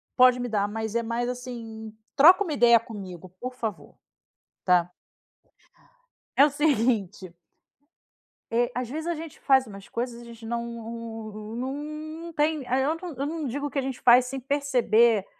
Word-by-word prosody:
pode 250 -1 +6
me 245 - -2
dar. 205 -2 +1
Mas 220 +1 -4
é 235 - +1
mais, 235 +1 -2
assim, 230 -3 -7 0.2
troca 350 +8 +7
uma 335 -6 -3
ideia 235 -4 +6
comigo, 190 -6 -9
por 255 +1 -5
favor, 210 -12 -5 0.7
tá? 180 -1 +3 1.4
É 280 - +8
o - - +2
seguinte 225 - 0 1.2
É, 240 +2 +1
às 250 0 -2
vezes 315 +5 -5
a 345 - 0
gente 320 -1 -9
faz 265 -1 +4
umas 195 -3 -12
coisas 235 0 -4
e - - -11
a - - -12
gente 230 0 -13
não 235 +1 -2
não 225 -2 -7
não 255 +3 -3 0.5
não 335 - -8
tem 305 -1 +1
ah, 255 +2 +1
eu 285 +4 +1
não 335 -2 -8
eu 275 - -2
não 310 -1 -3
digo 285 +4 -3
que 275 - -1
a - - +1
gente 265 -1 -4
faz 245 +1 +7
sem 265 +2 -5
perceber 240 -6 +2
240 Hz, 175 wpm, -26 LUFS, 220-275 Hz, 1.4 s, É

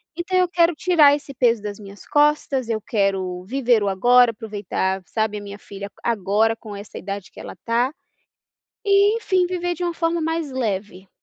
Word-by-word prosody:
Então, 355 +2 -1
eu 365 0 +4
quero 340 -1 +2
tirar 305 -3 +5
esse 285 -1 -9
peso 240 -3 +2
das 205 -1 -6
minhas 200 -1 -12
costas, 290 -4 +1
eu 220 -1 0
quero 195 -4 -1
viver 245 0 +2
o 205 - 0
agora, 245 +6 +5
aproveitar, 205 -3 -3
sabe, 220 +2 -1
a - - -10
minha 200 0 -8
filha 200 -1 -9
agora, 220 0 +1
com 215 -2 -10
essa 200 +1 -9
idade 195 0 -6
que - - -14
ela - - -8
está. 235 +3 -1 0.9
E, 405 +1 +4
enfim, 375 -5 +1
viver 355 -1 -2
de 355 - -4
uma 345 -1 -2
forma 330 0 0
mais 325 -1 -2
leve. 200 -6 -4
235 Hz, 180 wpm, -22 LUFS, 205-325 Hz, 0.9 s, tirar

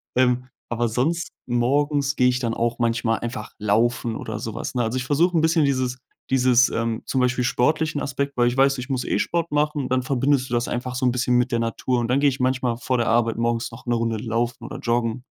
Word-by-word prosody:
Ähm, 125 0 +2 0.2
aber 120 0 0
sonst 150 +9 -1 0.2
morgens 140 +4 +1
gehe 125 - +4
ich 125 0 0
dann 115 -2 -1
auch 120 +1 -1
manchmal 115 -1 +1
einfach 115 -2 -5
laufen 115 +3 +1
oder 110 -1 -5
so 110 -2 -5
was, - - -4
ne? 125 -1 0
Also, 115 +3 -1
ich 125 - -2
versuche 165 +5 +2
'n - - +3
bisschen 160 -2 +3
dieses 130 -2 0 0.3
dieses, 125 -1 +4
ähm 115 -1 -2
zum 130 - 0
Beispiel 125 0 +1
sportlichen 155 +5 +1
Aspekt, 140 +1 -3
weil 120 -1 +3
ich 120 +2 -1
weiß, 135 -1 +3
ich 125 - -6
muss, 130 -2 -1
äh, - - 0
Sport 170 -2 -1
machen. 150 -2 0
Dann 130 0 +2
verbindest 130 0 +1
du 120 - -1
das 120 - 0
einfach 125 +1 -3
so 130 0 -1
'n 125 - +4
bisschen 125 0 +1
mit 125 +1 +1
der 115 - +1
Natur. 120 +2 -1
Und 115 - -1
dann 130 +3 +2
gehe 145 0 +4
ich 135 - -5
manchmal 130 -2 0
vor 125 +1 -1
der 120 - 0
Arbeit 115 0 +2
morgens 115 0 0
noch 115 - -12
'ne 120 - 0
Runde 115 -1 0
Laufen 115 +2 -2
oder - - -7
Joggen. 120 +1 -1
125 Hz, 240 wpm, -23 LUFS, 120-135 Hz, 0.3 s, gehe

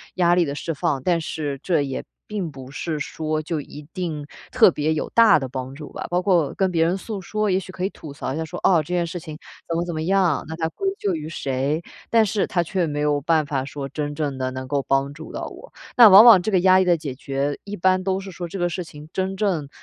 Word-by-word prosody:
压 175 -1 +3
力 175 -1 +3
的 140 -1 -4
释 165 +2 -3
放， 140 -2 -1
但 175 -2 +2
是 150 -3 -4
这 170 -5 +2
也 135 -2 -4 0.2
并 195 -6 -4
不 135 -2 -10
是 155 +1 -3
说 155 +1 -2
就 155 0 -3
一 145 +1 -11
定 165 -6 -4 0.3
特 255 -5 +6
别 155 0 0
有 155 - -3
大 230 -7 +6
的 135 - -4
帮 130 0 -5
助 150 0 -9
吧。 - - -5
包 175 +1 +1
括 175 -6 +2
跟 190 -1 +2
别 165 -2 +2
人 175 +3 +1
诉 200 0 -6
说， 215 +3 -1
也 185 - +2
许 185 - -9
可 185 0 -3
以 - - 0
吐 160 -7 -11
槽 135 -2 -4
一 150 - -4
下 160 - -2
说： 175 +3 -7
“哦， 170 -4 +4
这 - - -17
件 175 -1 +1
事 170 - -5
情 155 -3 -9 0.3
怎 165 - -2
么 170 - -1
怎 175 - -4
么 155 - -2
样， 180 -3 +2
那 160 - -6
它 160 -1 0
归 390 - -4
咎 200 -2 0
于 155 -1 -5
谁。” 140 +1 -1 0.3
但 225 -1 +5
是 205 0 0
它 175 - +1
却 180 +1 -1
没 145 -2 -3
有 150 -1 +1
办 160 +1 +2
法 140 -2 -2
说 140 0 -6
真 145 +1 -3
正 145 -3 -3
地 130 0 -2
能 130 0 -6
够 140 +1 -1
帮 135 +1 +1
助 160 +2 -10
到 - - -5
我。 - - -11 0.2
那 235 -3 +9
往 200 +4 +10
往 225 -6 +9
这 215 - -2
个 190 - +4
压 185 +1 +5
力 - - +4
的 175 -1 +3
解 145 -5 -6
决， 140 +1 -2
一 205 0 -6
般 185 +1 +2
都 190 0 0
是 195 0 -8
说 175 0 -6
这 195 +3 -6
个 175 - +2
事 180 +1 -4
情 150 -2 -12
真正 190 -5 -1
165 Hz, 290 characters per minute, -23 LUFS, 145-185 Hz, 0.3 s, 往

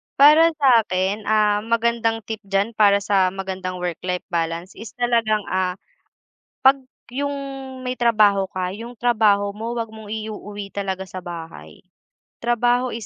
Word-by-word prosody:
Para 300 +4 +7
sa'kin, 210 -6 +2
ah, 210 -1 +3
magandang 230 0 0
tip 220 0 -5
diyan 195 +3 0
para 200 -1 +5
sa 195 -3 +3
magandang 190 -1 -4
work-life 180 +1 -3
balance 165 +1 -2
is 220 0 -11
talagang, 230 -3 +1
ah, 185 -1 0 0.9
'pag 270 +1 +6 0.3
yung 285 +2 -2 0.5
may 255 0 -3
trabaho 210 -4 +4
ka, 185 -1 -3
yung 230 +5 -8
trabaho 210 -4 +2
mo 225 +3 -5
'wag 230 -2 -3
mong 220 -1 -11
iuuwi 210 -2 -6
talaga 190 -1 -3
sa 185 0 -8
bahay. 170 -2 -9 0.6
Trabaho 240 +1 +1
is 230 -1 -6
210 Hz, 140 wpm, -22 LUFS, 190-235 Hz, 0.9 s, Para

